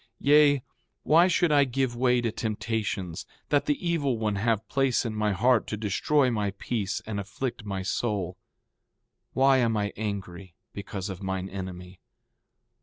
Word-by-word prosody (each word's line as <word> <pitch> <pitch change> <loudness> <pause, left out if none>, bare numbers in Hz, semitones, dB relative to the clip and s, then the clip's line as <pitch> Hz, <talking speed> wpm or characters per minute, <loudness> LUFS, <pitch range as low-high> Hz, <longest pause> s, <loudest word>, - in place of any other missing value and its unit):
Yea, 145 -2 +5 0.4
why 165 +4 +5
should 175 -2 +2
I 145 -1 +5
give 130 -1 -1
way 125 0 +2
to 115 -2 -1
temptations, 110 -5 -3 0.2
that 145 -1 +2
the 145 - +2
evil 145 -8 +1
one 105 -2 -1
have 110 +1 0
place 135 -3 +1
in 115 - -2
my 105 -1 0
heart 120 +3 +2
to 105 - -3
destroy 125 +6 +1
my 105 -3 0
peace 105 -4 -3
and 110 -2 -3
afflict 110 +4 -5
my 95 -2 -3
soul? 95 -3 -2 1.0
Why 135 0 +4
am 115 -3 +1
I 100 -1 -1
angry 100 -4 -5 0.2
because 100 -1 -5
of 95 0 -7
mine 95 0 -3
enemy? 90 -1 -7
110 Hz, 155 wpm, -27 LUFS, 100-130 Hz, 1.0 s, Yea